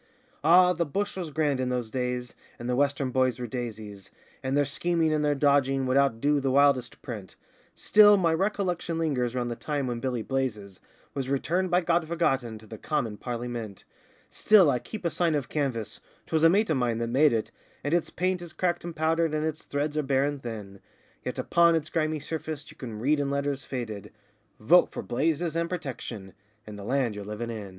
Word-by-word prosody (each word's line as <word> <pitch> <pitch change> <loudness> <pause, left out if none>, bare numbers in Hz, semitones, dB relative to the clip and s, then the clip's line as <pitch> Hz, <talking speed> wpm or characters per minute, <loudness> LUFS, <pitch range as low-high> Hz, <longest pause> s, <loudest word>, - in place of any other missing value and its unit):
Ah, 180 +3 +6
the 170 0 0
bush 200 +7 -2
was 180 -4 -4
grand 145 -2 0
in 130 -1 -1
those 125 -3 -2
days, 125 -1 -3 0.2
and 120 - -6
the 125 - 0
Western 140 -1 +1
boys 130 -2 +2
were 125 - -4
daisies, 110 -5 -6 0.3
And 130 +2 -1
their 145 - +3
scheming 165 +2 +1
and 150 -1 +1
their 145 -1 +2
dodging 135 -1 +2
would 130 0 0
outdo 140 +1 +2
the 135 -1 -1
wildest 135 -2 +2
print; 105 -8 -7 0.4
Still 210 -1 +6
my 170 -4 +2
recollection 180 -2 -1
lingers 130 -7 -1
round 120 -1 -1
the - - -3
time 145 +2 -2
when 120 -2 -3
Billy 125 -2 -2
Blazes 110 -8 -3 0.3
Was 135 -2 -3
returned 175 +7 0
by 180 +1 +3
God 170 -1 +1
Forgotten 135 -9 0
to 110 - -15
the 110 0 -10
'Commin 130 -9 -2
Parlymint': 120 -4 -5 0.5
Still 195 -8 +5
I 125 - 0
keep 185 - -8
a 170 - +1
sign 170 -2 +1
of 145 -3 -2
canvas 120 -8 -2 0.3
'twas 160 -1 0
a 165 - +7
mate 200 +2 +2
of 150 - +2
mine 120 -3 0
that 115 - -1
made 135 +6 +4
it 110 -2 -1 0.3
And 145 - -1
its 175 -1 +1
paint 185 0 -1
is 175 -2 -9
cracked 175 -1 -1
and 170 -1 -6
powdered, 160 0 +1
and 155 0 0
its 155 -1 -3
threads 145 +1 -3
are 155 - +2
bare 135 -1 +1
and 145 -1 -3
thin, 105 -5 -7 0.4
Yet - - -4
upon 170 -1 +4
its 155 -1 -2
grimy 155 -1 0
surface 155 -1 -5
you - - -16
can 115 -5 -7
read 145 +7 +1
in 140 -1 0
letters 140 -1 -2
faded: 115 -6 -5 0.5
'Vote 175 +12 +5
for - - -6
Blazes 160 +6 -1
and 170 0 0
Protection, 125 - -6 0.3
and 105 -1 -9
the - - -8
Land 125 0 0
you're 105 0 -7
livin' 105 +3 -5
in. 105 -3 -6
140 Hz, 205 wpm, -27 LUFS, 120-160 Hz, 0.5 s, a